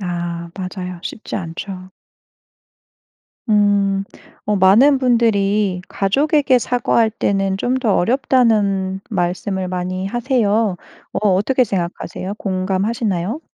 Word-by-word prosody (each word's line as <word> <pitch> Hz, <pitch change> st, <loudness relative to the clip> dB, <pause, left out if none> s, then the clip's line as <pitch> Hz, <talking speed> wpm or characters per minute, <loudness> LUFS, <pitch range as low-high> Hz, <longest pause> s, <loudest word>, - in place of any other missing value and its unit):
아 170 Hz, -2 st, -4 dB
맞아요. 180 Hz, -2 st, -6 dB
쉽지 220 Hz, -, -6 dB
않죠. 185 Hz, +1 st, -7 dB, 1.6 s
음. 200 Hz, -2 st, +2 dB, 0.4 s
어 210 Hz, -1 st, 0 dB
많은 230 Hz, +10 st, +5 dB
분들이 210 Hz, -6 st, +2 dB
"가족에게 275 Hz, -, +2 dB
사과할 235 Hz, -2 st, +1 dB
때는 195 Hz, -3 st, 0 dB
좀 245 Hz, +5 st, -1 dB
더 225 Hz, -6 st, +1 dB
어렵다."는 205 Hz, -5 st, +2 dB
말씀을 185 Hz, 0 st, -2 dB
많이 185 Hz, +1 st, -3 dB
하세요. 225 Hz, -4 st, +1 dB, 0.4 s
어 210 Hz, -, +1 dB
어떻게 230 Hz, +8 st, +2 dB
생각하세요? 185 Hz, 0 st, -4 dB
공감하시나요? 195 Hz, -, -2 dB
200 Hz, 235 characters per minute, -19 LUFS, 185-230 Hz, 1.6 s, 많은